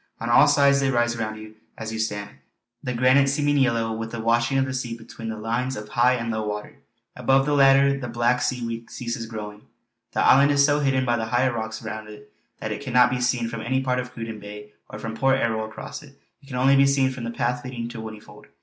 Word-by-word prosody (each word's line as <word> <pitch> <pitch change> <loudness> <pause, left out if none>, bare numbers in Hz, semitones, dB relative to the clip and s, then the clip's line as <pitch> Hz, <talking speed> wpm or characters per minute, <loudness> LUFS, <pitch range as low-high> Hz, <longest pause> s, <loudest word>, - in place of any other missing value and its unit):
On 115 +1 -2
all 150 - +7
sides 140 -1 +4
they 135 -1 +1
rise 120 -2 +1
round 110 -2 -4
you 110 0 -11 0.2
as 110 0 -5
you 110 - -4
stand, 105 -2 -3 0.5
the 125 -3 -4
granite 130 +3 +4
seeming 145 +1 +1
yellow 115 -3 +1
with 115 0 -5
the 115 - -5
washing 115 +3 +1
of 135 - +2
the 130 - -4
sea 120 -3 -4
between 115 0 -9
the 110 - -5
lines 120 +4 -2
of 105 0 -8
high 120 +3 +3
and 115 -1 -3
low 110 0 -2
water; 105 +7 -6 0.4
above 135 +2 +2
the 145 - 0
latter 140 0 +5
the 125 - -5
black 120 +1 +1
seaweed 115 -2 -3
ceases 120 -1 -5
growing. 105 -2 -7 0.5
This - - 0
island 140 +2 +6
is 140 -1 +4
so 145 0 +2
hidden 135 -2 +1
by 120 -1 +1
the 110 - -2
higher 120 +3 +1
rocks 110 -1 -5
around 110 0 -6
it 105 0 -13 0.2
that - - -5
it - - -4
cannot 125 -2 +3
be 125 0 -1
seen 125 -1 0
from 115 -1 -5
any 130 +3 0
part 125 -1 0
of 125 0 -5
Cruden 115 -2 -7
Bay 105 0 -10 0.2
or 105 - -8
from 110 +1 -6
Port 135 +2 +2
Erroll 110 -2 0
across 110 - -8
it; 140 -2 -17 0.2
it 140 - -19
can 135 - -7
only 135 +2 +4
be 135 0 +5
seen 135 -1 +2
from 130 -2 -7
the 115 - -3
path 120 +1 -2
leading 125 -2 -5
to 120 -2 -7
Whinnyfold. 110 -1 -11
120 Hz, 240 wpm, -24 LUFS, 110-130 Hz, 0.5 s, all